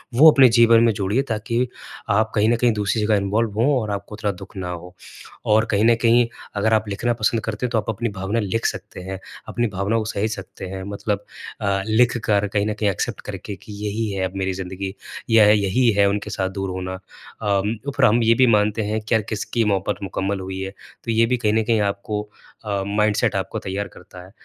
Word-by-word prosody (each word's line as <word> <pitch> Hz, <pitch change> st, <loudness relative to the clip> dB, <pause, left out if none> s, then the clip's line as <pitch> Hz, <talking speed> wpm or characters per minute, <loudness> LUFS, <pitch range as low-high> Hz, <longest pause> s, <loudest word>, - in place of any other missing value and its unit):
वो 155 Hz, +6 st, +9 dB
अपने 135 Hz, -4 st, +7 dB
जीवन 115 Hz, 0 st, +6 dB
में 115 Hz, -, +4 dB
जोड़िए 100 Hz, +5 st, 0 dB
ताकि 115 Hz, +3 st, 0 dB, 0.4 s
आप 110 Hz, +2 st, +2 dB
कहीं 110 Hz, +2 st, +3 dB
न 120 Hz, -, +4 dB
कहीं 120 Hz, 0 st, +3 dB
दूसरी 105 Hz, +1 st, 0 dB
जगह 110 Hz, 0 st, +3 dB
इन्वॉल्व 105 Hz, +3 st, 0 dB
हो 140 Hz, +1 st, +3 dB
और 105 Hz, -1 st, -3 dB
आपको 100 Hz, +1 st, -5 dB
इतना 105 Hz, -1 st, 0 dB
दुःख -, -, -15 dB
ना 90 Hz, -1 st, -4 dB
हो। 90 Hz, +1 st, -8 dB, 0.6 s
और 110 Hz, +1 st, +4 dB
कहीं 100 Hz, +1 st, +2 dB
न 115 Hz, 0 st, +6 dB
कहीं 120 Hz, 0 st, +4 dB, 0.3 s
अगर 110 Hz, +2 st, +2 dB
आप 110 Hz, -1 st, +2 dB
लिखना 115 Hz, +4 st, 0 dB
पसंद 115 Hz, 0 st, +2 dB
करते 110 Hz, +3 st, -3 dB
हैं 120 Hz, -, -3 dB
तो 115 Hz, -, +1 dB
आप 110 Hz, -, -2 dB
अपनी 115 Hz, +1 st, -1 dB
भावना 100 Hz, +5 st, -1 dB
लिख 110 Hz, +2 st, -2 dB
सकते -, -, -4 dB
हैं, 95 Hz, +1 st, -6 dB, 0.3 s
अपनी 120 Hz, -1 st, 0 dB
भावना 100 Hz, +4 st, 0 dB
को 110 Hz, -, -1 dB
सहेज 110 Hz, +2 st, -1 dB
सकते 95 Hz, -1 st, -9 dB
हैं 95 Hz, 0 st, -6 dB
मतलब 100 Hz, 0 st, -2 dB, 0.4 s
अ, 100 Hz, -1 st, +1 dB
लिखकर 110 Hz, -3 st, +2 dB
कहीं 100 Hz, 0 st, 0 dB
न 105 Hz, -, 0 dB
कहीं 105 Hz, -1 st, 0 dB
एक्सेप्ट 95 Hz, -, -3 dB
करके 100 Hz, -, -7 dB
कि 105 Hz, -, -12 dB
यही 105 Hz, +1 st, -2 dB
है 95 Hz, -1 st, -1 dB
अब 95 Hz, -, -16 dB
मेरी 95 Hz, 0 st, -1 dB
ज़िंदगी 95 Hz, +1 st, -5 dB, 0.3 s
यह 110 Hz, -2 st, +7 dB
यही 105 Hz, +5 st, +2 dB
है 100 Hz, -, +5 dB
उनके 105 Hz, +1 st, -2 dB
साथ 95 Hz, -2 st, -2 dB
दूर 95 Hz, -1 st, -2 dB
होना। 95 Hz, 0 st, -4 dB
अम, 100 Hz, +2 st, -3 dB, 0.2 s
पर -, -, +5 dB
हम 115 Hz, +3 st, +4 dB
ये 115 Hz, +1 st, +5 dB
भी 130 Hz, 0 st, +5 dB
मानते 105 Hz, 0 st, +3 dB
हैं 110 Hz, +1 st, -1 dB
कि 110 Hz, +2 st, -3 dB
यार 110 Hz, -, +4 dB
किसकी 115 Hz, +2 st, -1 dB
मोहबत 100 Hz, 0 st, 0 dB
मुकम्मल 95 Hz, +1 st, -2 dB
हुई 95 Hz, 0 st, -5 dB
है, 95 Hz, 0 st, -4 dB, 0.3 s
तो 115 Hz, -, -2 dB
ये 115 Hz, +1 st, +4 dB
भी 125 Hz, +2 st, +1 dB
कहीं 105 Hz, -3 st, +1 dB
न 110 Hz, 0 st, +2 dB
कहीं 115 Hz, 0 st, +2 dB
आपको 105 Hz, +1 st, -2 dB, 0.4 s
अ, 100 Hz, -2 st, -1 dB
माइंडसेट 105 Hz, 0 st, +1 dB
आपको -, -, -2 dB
तैयार 100 Hz, +2 st, -4 dB
करता 90 Hz, -1 st, -13 dB
है। 95 Hz, -, -16 dB
105 Hz, 225 wpm, -22 LUFS, 100-115 Hz, 0.6 s, वो